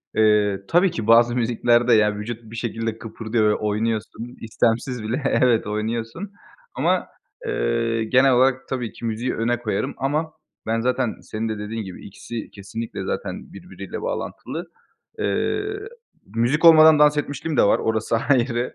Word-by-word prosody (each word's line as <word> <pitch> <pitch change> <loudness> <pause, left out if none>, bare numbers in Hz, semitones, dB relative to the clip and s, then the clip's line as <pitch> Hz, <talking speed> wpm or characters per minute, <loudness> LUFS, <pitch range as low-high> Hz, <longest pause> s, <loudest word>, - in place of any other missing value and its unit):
Eee, 105 -2 +3
tabii 180 +1 +3
ki 110 -1 -5
bazı 120 +1 +5
müziklerde, 120 0 +2
yani, 105 -1 +3
vücut 115 +2 -6
bir 115 - -8
şekilde 115 -1 -3
kıpırdıyor 110 -1 -1
ve 105 - +2
oynuyorsun. 110 +2 -3
İstemsiz 115 +2 -1
bile 120 +7 -2
Evet 125 -5 +2
oynuyorsun. 115 - -3 0.4
Ama, - - +1 0.4
eee, 115 - 0
genel 130 +4 +4
olarak, 130 +1 +2
tabii 125 -4 -3
ki - - -8
müziği 115 +3 -2
öne 120 +1 0
koyarım. 105 -4 -2
Ama 155 +4 -1 0.3
ben 115 +1 +1
zaten, 125 -1 0
senin 110 +1 -4
de 110 - -3
dediğin 110 +2 -5
gibi, 95 -2 -10
ikisi 110 +3 -8
kesinlikle 105 +3 -6
zaten 475 - -5
birbiriyle - - -8
bağlantılı. - - -5 0.5
Eee, 415 - 0 0.7
müzik 125 +8 +2
olmadan 160 -2 +8
dans 150 0 +5
etmişliğim 145 +1 -3
de - - +6
var, 100 - +3
orası 110 0 0
ayrı. 120 -2 +1
115 Hz, 145 wpm, -22 LUFS, 110-130 Hz, 0.7 s, olmadan